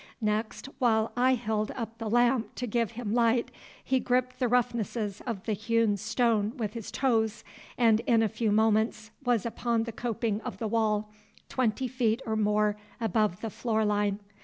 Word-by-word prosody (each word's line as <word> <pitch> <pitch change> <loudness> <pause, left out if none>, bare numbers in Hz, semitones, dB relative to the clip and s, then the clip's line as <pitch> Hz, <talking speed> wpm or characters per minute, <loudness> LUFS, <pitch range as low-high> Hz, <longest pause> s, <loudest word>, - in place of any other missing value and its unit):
Next, 215 0 -1
while 225 -3 +2
I 255 +1 +4
held 215 -2 -1
up 230 -1 -6
the 225 -2 -3
lamp 240 +1 +2
to 250 - -3
give 230 0 -1
him 225 -3 -3
light, 235 0 +2 0.3
he 265 - +1
gripped 255 0 0
the 250 - +2
roughnesses 230 -4 0
of 220 -6 -3
the 220 - -1
hewn 225 0 +1
stone 220 +1 0
with 215 -4 -3
his 230 -3 -6
toes, 225 -4 0 0.3
and 225 -3 +4
in 230 -2 +4
a - - +3
few 220 0 -1
moments 220 0 +2
was 240 -5 +1
upon 235 0 0
the 230 - -5
coping 225 -2 -2
of 195 - -6
the 220 - -2
wall, 215 -1 0 0.4
twenty 255 0 0
feet 240 -3 0
or 220 - -1
more 210 0 +2 0.2
above 215 -4 0
the 225 - -4
floor 220 -1 0
line. 205 -1 +1
225 Hz, 175 wpm, -29 LUFS, 215-240 Hz, 0.4 s, I